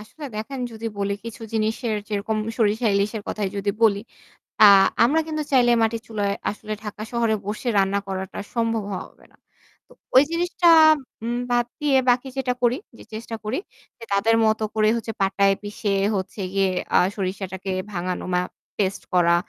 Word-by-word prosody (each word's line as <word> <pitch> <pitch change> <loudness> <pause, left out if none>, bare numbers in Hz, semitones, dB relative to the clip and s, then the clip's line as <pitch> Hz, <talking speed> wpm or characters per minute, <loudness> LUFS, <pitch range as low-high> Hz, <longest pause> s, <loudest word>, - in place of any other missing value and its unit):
আসলে 255 +8 -11
দেখেন 255 +5 -5
যদি 225 0 -6
বলি 200 0 0
কিছু 230 0 -8
জিনিসের 220 +1 -1
যেরকম 215 +1 -2 0.2
সরিষা 225 0 +1
ইলিশের 205 +2 0
কথায় 205 -3 -2
যদি 200 0 0
বলি। 205 -3 +4 0.6
আ - - +12 0.4
আমরা 285 +7 +3
কিন্তু 310 -1 -2
চাইলে 245 -3 +5
মাটির 225 0 +1
চুলায় 205 -3 -1 0.2
আসলে 215 +1 -6
ঢাকা 210 0 -7
শহরে 230 -2 +1
বসে 215 +4 -4
রান্না 195 +1 +2
করাটা 190 -1 -5 0.2
সম্ভব 230 -2 0
হওয়া 185 - -4
হবে - - -23
না। - - -26 0.5
তো - - -27 0.2
ওই 260 - +9
জিনিসটা 345 0 +2 0.5
উম 240 +1 -1
বাদ 240 0 +3
দিয়ে 290 -3 +3
বাকি 245 +2 +2
যেটা 260 -2 0
করি 245 +1 +3 0.2
যে - - -12
চেষ্টা 225 +1 -5
করি 215 +5 -2 0.6
তাদের 225 +3 +3
মতো 220 0 +1
করে 215 0 +3
হচ্ছে 225 -1 -4
পাটায় 195 0 +3
পিষে 205 0 -2 0.2
হচ্ছে 195 +2 -4
গিয়ে 195 -1 +2 0.3
আ - - +7 0.2
সরিষাটাকে 190 -1 -4 0.2
ভাঙানো 180 -1 -3
বা 180 - +3 0.4
পেস্ট 195 -1 -1
করা। 170 -1 +5
215 Hz, 165 wpm, -23 LUFS, 200-235 Hz, 0.6 s, আ